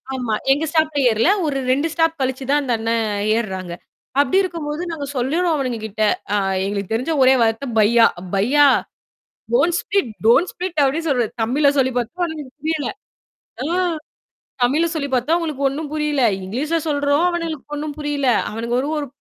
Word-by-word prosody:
ஆமா. 245 -4 -2 0.2
எங்க 305 +3 -1
ஸ்டாப்ல 315 -2 +1
ஏறல. 220 +9 +2 0.2
ஒரு 280 -2 -1
2 285 +5 +1
ஸ்டாப் 325 -1 +1
கழிச்சு 260 +1 -1
தான் 290 0 +3
அந்த 255 -3 -1
அண்ணன் 225 0 0 0.3
ஏர்றாங்க. 190 -5 -4 0.5
அப்டி 285 +7 +1
இருக்கும்போது, 330 -3 -4
நாங்க 295 -3 -4
சொல்லுறோம் 320 +7 +1
அவனுங்க 255 -5 -2
கிட்ட 215 +1 -2 0.3
அ - - +3 0.3
எங்களுக்கு 200 +1 -3
தெரிஞ்ச 255 +8 -1
ஒரே 260 +1 +6
வார்த்த 225 +4 -1
பையா. 230 +2 +5 0.3
பையா, 265 +9 +4 0.9
டோன் 350 -8 +3
ஸ்பிட் 335 - -1 0.2
டோன் 270 +10 +5
ஸ்பிட் 355 -4 -1
அப்டி 275 +4 +1
சொல்றது. 245 -5 +1
தமிழ்ல 280 +5 +3
சொல்லி 260 -1 +2
பாத்தோம் 325 +10 -2
அவுனுங்களுக்கு 305 -4 -8
புரியல. 315 -2 -1 0.8
ஆ. - - -2 1.0
தமிழ்ல 295 +7 +3
சொல்லி 285 -3 -2
பாத்தோம் 260 +6 +2
அவுங்களுக்கு 305 -5 -1
ஒண்ணும் 290 +2 -5
புரியல! 300 -3 0 0.2
இங்கிலீஷ்ல 280 - -1
சொல்றோம் 285 +1 +1
அவனுங்களுக்கு 330 -4 -4
ஒண்ணும் 295 0 -4
புரியல. 290 -2 -2 0.2
அவனுங்க 230 +2 -3
ஒரு 280 - -3
ஒரு 290 - -3
285 Hz, 160 wpm, -20 LUFS, 240-315 Hz, 1.0 s, ஒரே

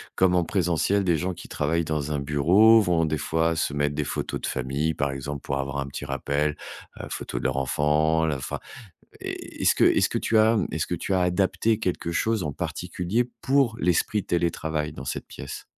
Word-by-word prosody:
comme 95 -1 +3
en 90 - +3
présentiel, 90 +2 +1
des 85 -3 +2
gens 90 +3 -2
qui - - -10
travaillent 80 +3 -1
dans 75 -1 -2
un 75 - -1
bureau, 90 +11 +5
vont 85 -4 +2
des 80 -1 -1
fois 80 +2 +1
se 80 -3 -1
mettre 75 0 0
des 75 - -1
photos - - -4
de - - -3
famille, 70 +5 -1
par 70 -1 0
exemple, 70 +1 -5
pour 70 0 -3
avoir 70 0 -3
un 70 - -2
petit 70 +1 -6
rappel, 70 +2 -1 0.4
heu, - - -5
photo - - -5
de - - -3
leur 65 0 0
enfant, 75 +5 +2
la 75 -3 0
enfin, 65 - -4 0.6
est - - -7
est-ce - - +4
que - - +3
est-ce - - +4
que - - -1
tu 110 - +2
as, 110 +1 +5
mmh, 105 - +1
est-ce 80 0 -1
que - - -2
tu 90 - -3
as 95 - +2
adapté 95 +4 +1
quelque 90 -4 -2
chose 110 +4 0
en 75 -3 -3
particulier, 100 - -2
pour 135 -4 +2
l'esprit 90 +3 +1
télétravail, 80 -3 -1
dans 70 -3 -8
cette - - -4
pièce? - - -8
80 Hz, 215 wpm, -25 LUFS, 75-90 Hz, 0.6 s, bureau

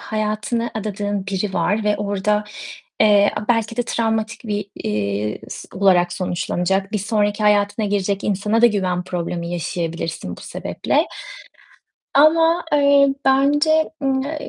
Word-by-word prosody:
hayatını 215 +2 -2
adadığın 205 -2 -3
biri 195 0 -2
var 205 +5 0
ve 210 0 +2
orada, 205 +1 0 0.6
eee, 205 -1 +5
a 210 - -4
belki 230 -1 +1
de 245 - +1
travmatik, 225 -1 -2
bir, 205 -2 -3
eee, 105 0 -2
s - - -8
olarak 180 -2 +3
sonuçlanacak, 185 +2 -1
bir 210 - 0
sonraki 205 0 0
hayatına 210 +1 +2
girecek 200 0 -1
insana 210 +3 0
da - - +9
güven 185 -5 0
problemi 170 -1 -4
yaşayabilirsin 165 -1 -4
bu - - -13
sebeple. - - -1 1.1
Ama, 325 +4 +4
eee, 280 -1 +4
bence, 290 +4 +3
ımm, 265 -1 +1
eee, 300 +2 -5
210 Hz, 135 wpm, -20 LUFS, 190-230 Hz, 1.1 s, da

